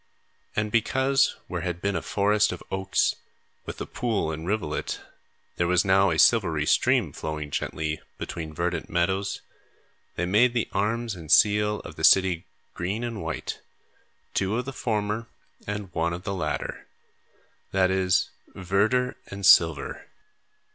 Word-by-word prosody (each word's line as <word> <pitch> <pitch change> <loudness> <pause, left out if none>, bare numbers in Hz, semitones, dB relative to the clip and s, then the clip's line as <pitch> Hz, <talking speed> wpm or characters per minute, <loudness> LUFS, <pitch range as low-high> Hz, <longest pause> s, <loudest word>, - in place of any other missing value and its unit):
And, 105 0 -1
because 130 +4 +2
where 90 -2 -4
had 90 0 -3
been 100 +1 -1
a 80 - -1
forest 105 +1 +2
of 90 - -7
oaks, 95 -1 +1 0.5
with - - -6
the - - -4
pool 110 -10 -1
and 80 +2 -6
rivulet, 95 -7 -2 0.6
there 85 - +1
was 90 +2 +3
now 95 0 +4
a - - 0
silvery - - +4
stream - - +2
flowing 75 -2 -5
gently 80 +3 -3 0.2
between 80 -2 -5
verdant - - -2
meadows, 95 +3 0 0.7
they 90 - -1
made 115 +7 +3
the 115 - +1
arms 115 +3 -1
and 80 -5 -8
seal 105 0 +4
of 80 - -11
the 80 - -6
city 95 -1 +5 0.3
green 100 +7 -3
and 115 -3 -4
white, 80 0 -4 0.7
two 100 +3 0
of 125 - -2
the 135 - -5
former 110 -1 -2 0.4
and 105 -3 -5
one 85 0 0
of 90 +1 -6
the 100 - -3
latter; 95 - -3 0.8
that 95 -1 +3
is, 95 0 +2 0.2
verdure 105 +7 +1
and 100 0 -5
silver. 80 -4 +4
95 Hz, 145 wpm, -26 LUFS, 85-105 Hz, 0.8 s, city